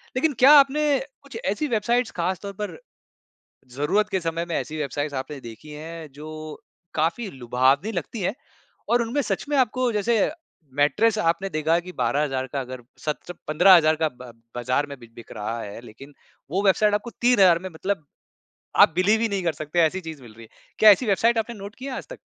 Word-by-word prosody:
लेकिन 295 +3 +1
क्या 270 +3 +8
आपने 285 +3 -2 0.4
कुछ 275 -5 -9
ऐसी 300 +9 -2
वेबसाइट्स 235 +2 +1
ख़ास 180 +2 0
तौर 200 - -5
पर 210 - -4 1.0
ज़रूरत 190 +10 +1
के 190 -2 0
समय 165 +1 -2
में - - -1
ऐसी 155 - -4
वेबसाइट्स 145 0 -3
आपने 140 0 -9
देखी 115 +7 -12
हैं 160 +1 -8
जो 155 +1 -8 0.7
काफ़ी 170 +7 -1
लुभावनी 130 - +2
लगती 205 +7 -6
है 210 - -3 0.6
और 240 0 +3
उनमें 235 +5 -1
सच - - -2
में 290 - +1
आपको 255 0 +2
जैसे 230 +3 +1 0.6
मैट्रेस 215 +10 +3
आपने 180 +2 0
देखा 160 +2 +2
कि 180 - -7
12,000 135 -3 0
का 140 - +1
अगर 130 -1 -8 0.2
सत्र 155 +3 -4
15,000 155 0 +6
का 155 - +3
ब 125 -2 -10 0.2
बाजार 125 +4 0
में 140 - -7
बि 120 - -13
बिक 120 - -12
रहा 115 +3 -3
है 105 +2 -8
लेकिन 135 +6 -14 0.4
वो 190 +4 0
वेबसाइट 210 +2 +4
आपको 210 +3 -1 0.2
3,000 190 -9 +6
में 185 - -7
मतलब 175 0 -3 0.8
आप - - +7
बिलीव 200 +5 +3
ही 230 - +2
नहीं 200 -2 -2
कर 165 -2 0
सकते, 155 +3 -3
ऐसी 170 +3 +2
चीज़ 160 -4 -8
मिल 120 -3 -13
रही 115 +1 -13
है। 110 - -15 0.3
क्या 215 - +9
ऐसी 205 +6 +3
वेबसाइट 225 +3 +2
आपने 230 +2 -2
नोट 200 +1 -9
किया 270 +2 -7
है - - -4
आजतक? - - -9
175 Hz, 195 wpm, -24 LUFS, 150-220 Hz, 1.0 s, क्या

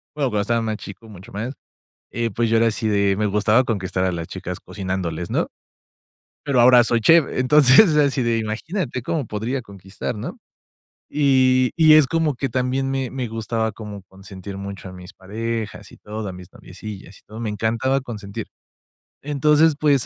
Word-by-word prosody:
bueno, 140 -3 0
cuando 105 -3 0
estaba 115 +3 0
más 110 -1 -2
chico, 105 +3 -11
mucho 95 -3 -13
más, 115 +6 -4 0.6
eh, 115 -1 -2
pues, 115 +2 0
yo 115 - +3
era 115 +1 +4
así 110 0 -1
de, 100 -2 +2
me 105 - 0
gustaba 105 +4 +3
conquistar 95 -4 -2
a 95 - +1
las 85 -1 -5
chicas - - -6
cocinándoles, 95 -4 -4
¿no? - - 0 1.0
Pero 135 -4 +2
ahora 125 0 +7
soy 115 0 +1
chef, 165 +5 +6
entonces, 145 - +5
así 140 -3 +2
de, 115 -1 +1
imagínate 125 - -3
cómo 150 0 -2
podría 115 +6 -3
conquistar, 100 +2 -7
¿no? 105 - -6 0.8
Y 130 -3 +3
y 160 -2 +6
es 155 -3 +6
como 165 -1 +1
que 135 +1 -2
también 130 +2 -1
me 135 -2 -2
me 130 -2 -3
gustaba 110 0 -2
como 105 -1 -9
consentir 95 0 -10
mucho 100 -1 -7
a - - -11
mis 90 +1 -12
parejas 110 +3 -5
y - - -15
todo, 105 0 -6
a 95 - -5
mis 90 -1 -12
noviecillas 100 -3 -10
y - - -32
todo, 110 +2 -10
me 115 -2 -3
encantaba 115 +6 0
consentir. 105 -6 -7 0.7
Entonces, 150 +2 +3
pues, 140 -5 +3
115 Hz, 180 wpm, -22 LUFS, 100-130 Hz, 1.0 s, ahora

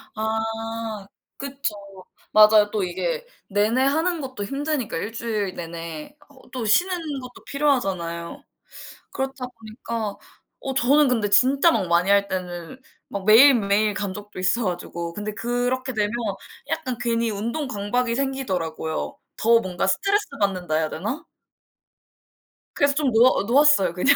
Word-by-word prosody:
아 220 -1 -3 0.3
그쵸. 275 -4 -3 0.6
맞아요. 215 0 +7
또 210 -3 0
이게 - - -2 0.2
내내 210 +6 +2
하는 320 +5 +1
것도 260 -6 -5
힘드니까 275 - -2
1 205 +7 -4
주일 215 -5 -2
내내 165 - -7
어 265 -2 -19
또 250 -4 -4
쉬는 355 - +3 0.2
것도 250 0 -12
필요하잖아요. 195 - -1 0.7
그렇다 265 -1 -4
보니까 220 -2 -6 0.5
어 270 - -3
저는 280 +3 +4
근데 225 -5 +1
진짜 270 +9 +5
막 185 - 0
많이 175 +3 +2
할 200 0 +4
때는 180 +5 -5 0.3
막 195 -1 -5
매일매일 215 -3 +6
간 200 -1 -3
적도 205 -2 -9
있어 205 +5 +1
가지고 170 -1 -4
근데 210 +2 -4
그렇게 245 +3 -1
되면 210 -1 0 0.6
약간 255 -6 -2
괜히 230 -1 0
운동 235 +9 -3
강박이 235 +2 -1
생기더라고요. 190 -13 -3 0.2
더 230 +1 +5
뭔가 185 -2 -2
스트레스 400 - +1
받는다 185 -5 -1
해야 155 0 +1
되나? 220 - -4 1.5
그래서 285 -1 +3
좀 285 -3 +1
놓아 235 0 +5
놓았어요 240 - +4
그냥. 265 +11 +4
225 Hz, 285 characters per minute, -23 LUFS, 200-265 Hz, 1.5 s, 맞아요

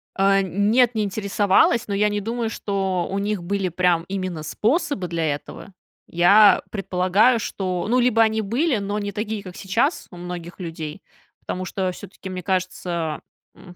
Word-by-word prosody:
А. 195 0 +4
Нет, 210 +7 +2
не 215 - +1
интересовалась, 205 +2 +2
но 200 - -3
я 210 +1 +2
не 205 0 -2
думаю, 230 +2 -2
что 195 -4 -2
у 195 - -2
них 205 -2 -2
были, 195 +1 -1
прям, 175 -1 +2
именно 185 -5 -4
способы 220 - 0
для 165 -1 -2
этого. 190 +6 -11 0.3
Я 200 +5 +6
предполагаю, 195 +4 +2
что, 185 -3 -3
ну, 250 +2 +3
либо 240 -2 +3
они 220 0 +3
были, 245 +7 0
но 205 +1 -2
не 205 0 -3
такие, 210 +1 -3
как 185 -3 -10
сейчас, 230 - 0
у 180 - -11
многих 175 0 -7
людей, 165 0 -6 0.4
потому 185 0 -5
что 185 0 -2
всё-таки, 190 +1 -10
мне 185 -1 -5
кажется, 175 -3 -2 0.3
м, 180 -2 -14
195 Hz, 165 wpm, -22 LUFS, 180-215 Hz, 0.4 s, Я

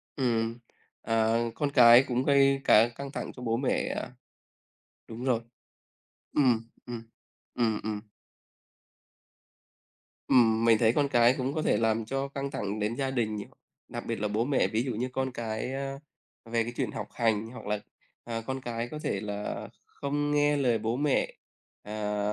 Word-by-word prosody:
Ừm. 115 -3 0 0.4
À, 115 0 +2 0.2
con 145 -2 0
cái 120 -1 +8
cũng 125 0 0
gây 140 -1 +4
cả 115 -2 +6
căng 140 +1 -6
thẳng - - -5
cho 125 - -10
bố 115 -1 0
mẹ, 130 +1 0
à. - - -5 1.0
Đúng 115 +2 -7
rồi. 120 -3 +2 0.9
Ừm, 120 -5 +2 0.2
ừm, 120 -2 -6 0.5
ừm, 110 -3 +1
ừm. 105 -1 -3 2.3
Ừm. 115 -2 +4
Mình 115 -1 +6
thấy 115 +1 +3
con 145 -1 +2
cái 120 -2 +5
cũng 130 +2 -1
có 155 - -1
thể - - +2
làm 110 0 +1
cho 135 +3 -2
căng 140 0 -4
thẳng 105 -6 -3
đến 105 +3 -1
gia 135 0 -1
đình 110 -4 0
nh 100 - -4 0.4
Đặc - - -6
biệt - - -3
là 105 - 0
bố 105 +3 0
mẹ 140 0 +2
ví 110 +1 0
dụ 130 - -2
như 125 +4 -2
con 130 0 -1
cái, 115 +2 -4
a, 135 0 -4 0.5
về 115 0 0
cái 120 +2 -6
chuyện - - -1
học - - -5
hành, 110 -2 +1
hoặc 125 - -10
là, 105 0 -1 0.5
à, 115 -1 -3
con 130 +3 -4
cái 120 -1 -3
có 150 - -6
thể 100 - -2
là 105 -1 -4 0.2
không 145 +1 -2
nghe 145 0 +3
lời 125 -5 +2
bố 110 +2 -1
mẹ, 145 -1 +1 0.5
à, 105 0 -3
120 Hz, 175 wpm, -29 LUFS, 110-135 Hz, 2.3 s, cái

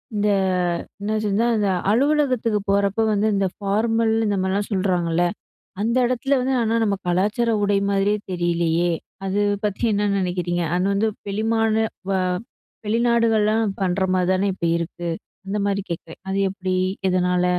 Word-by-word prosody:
இந்த 205 0 +1 0.7
என்னாச்சுன்னா 215 +1 0
இந்த 205 -2 +1 0.2
அலுவலகத்துக்கு 255 -4 +2
போறப்போ 200 +2 +2
வந்து 210 +1 +1
இந்த 195 -1 +1
ஃபார்மல் 220 +3 +1
இந்த 205 - +1
மாரிலாம் 195 +2 -1
சொல்றாங்கல்ல? 175 -3 +1 0.6
அந்த 230 +3 0
இடத்ல 255 +3 0
வந்து 260 +1 0
ஆனா 225 0 0
நம்ம 200 -2 +1
கலாச்சார 210 +7 +1
உடை 205 0 +2
மாதிரியே 200 +1 +1
தெரியலையே? 170 -1 +1 0.3
அது 195 +2 0 0.2
பத்தி 205 +1 -2
என்ன 205 0 +1
நெனைக்கிறீங்க? 180 -2 -1
அது 180 +2 +1
வந்து 215 +3 +2 0.2
பெருமாளான 220 +2 +1 0.3
வா 190 - +2 0.7
வெளிநாடுகள்லாம் 225 -1 +2
பண்ற 190 0 0
மாரி 180 -1 +1
தானே 190 +2 +1
இப்ப 185 - -6
இருக்கு! 170 +1 -5 0.4
அந்த 200 +2 -2
மாரி 200 0 0
கேக்குறேன். 165 -1 -7
அது 195 +1 -1
எப்டி? 185 -1 -3 0.3
எதனால? 180 -1 +1
200 Hz, 135 wpm, -22 LUFS, 185-220 Hz, 0.7 s, அலுவலகத்துக்கு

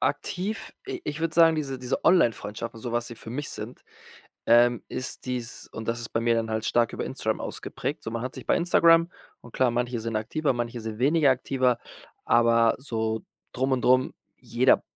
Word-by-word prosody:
aktiv, 200 +5 -2
i 390 -2 -5
ich 150 - -4
würde 165 -1 -1
sagen, 165 -1 +6
diese 135 -4 -3
diese 125 +1 -3
Onlinefreundschaften 115 - +1
und - - -14
so, 120 - -4
was 120 0 -1
sie 120 - -8
für 110 - -10
mich 145 +4 -4
sind, - - -8 0.6
ähm, 120 0 +5
ist 130 0 -4
dies 125 -2 -5
und 110 0 -7
das 115 +1 0
ist 115 - -7
bei 115 - 0
mir 115 0 +2
dann 115 -1 -1
halt 110 0 -2
stark 120 -2 +2
über - - -3
Instagram - - -2
ausgeprägt. - - -5
So 115 - -5
man 115 0 -4
hat 130 - -5
sich - - -9
bei - - +3
Instagram 170 -1 +4 0.3
und 120 - -15
klar, 130 -2 +2
manche 120 0 -1
sind 115 0 -3
aktiver, 140 +8 0
manche 120 -1 -3
sind 110 -1 -6
weniger 145 +3 +4
aktiver, 130 -1 +1 0.5
aber 115 -1 +4
so 110 -4 -2 0.3
drum 130 +2 0
und 130 -2 +1
drum, 130 +1 +3 0.2
jeder - - +3
120 Hz, 200 wpm, -26 LUFS, 115-140 Hz, 0.6 s, sagen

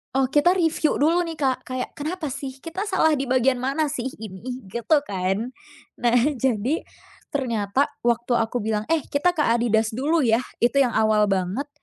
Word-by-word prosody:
Oh, 270 - +3
kita 300 +8 +3
reviu 325 -2 +1
dulu 330 +5 +3
nih, 330 -2 -4
Kak, 265 -3 0
kayak, 255 0 -4
"Kenapa 310 -1 -4
sih? 270 -1 -6
Kita 330 +7 -6
salah 320 -4 +3
di 270 -3 -2
bagian 255 0 +2
mana 275 +4 0
sih 265 -3 -3
ini?", 225 +4 -7
gitu 235 - +1
kan. 195 +5 -2 0.5
Nah, 240 0 +4 0.2
jadi, 260 +2 0 0.5
ternyata 245 -3 0 0.2
waktu 240 +1 +1
aku 230 +1 0
bilang, 215 0 -2
"Eh, 325 -3 +1
kita 340 +4 0
ke 300 - +2
Adidas 225 -2 +2
dulu, 290 +4 +1
ya", 225 +1 +3 0.2
itu 260 +4 +3
yang 245 -4 +1
awal 215 -1 +3
banget. 195 +9 -1
255 Hz, 170 wpm, -23 LUFS, 225-295 Hz, 0.5 s, Nah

